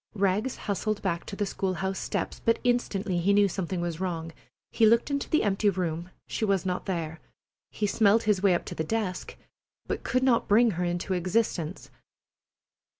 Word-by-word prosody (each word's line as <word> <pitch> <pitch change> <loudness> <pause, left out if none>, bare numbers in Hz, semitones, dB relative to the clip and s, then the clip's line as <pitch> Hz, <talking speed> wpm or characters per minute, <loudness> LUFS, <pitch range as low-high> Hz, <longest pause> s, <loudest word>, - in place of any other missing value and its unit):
Rags 200 +5 +1
hustled 210 +1 -2
back 170 -3 -2
to - - -5
the 205 - -1
school 190 -1 -2
house 190 +1 -2
steps, - - -3
but 230 0 +3
instantly 210 -7 0
he 195 +4 +3
knew 205 0 +5
something 185 -1 -3
was 170 -2 -3
wrong. 165 -3 -3 0.4
He 225 - +4
looked 230 +6 +3
into 280 0 -2
the 310 - +3
empty 205 0 +2
room. 175 -2 -2 0.2
She - - -4
was 195 -3 +1
not 180 +1 -2
there. 165 -4 -3 0.5
He 210 - -2
smelled 215 +2 +3
his 210 -3 +2
way 195 -3 +4
up - - -3
to - - -6
the 160 - -2
desk, 200 0 -3 0.5
but - - -3
could 255 0 +1
not 250 -3 +3
bring 225 +3 +5
her 180 -1 -2
into 175 +2 -1
existence. 180 -2 -1
195 Hz, 185 wpm, -27 LUFS, 180-215 Hz, 0.5 s, knew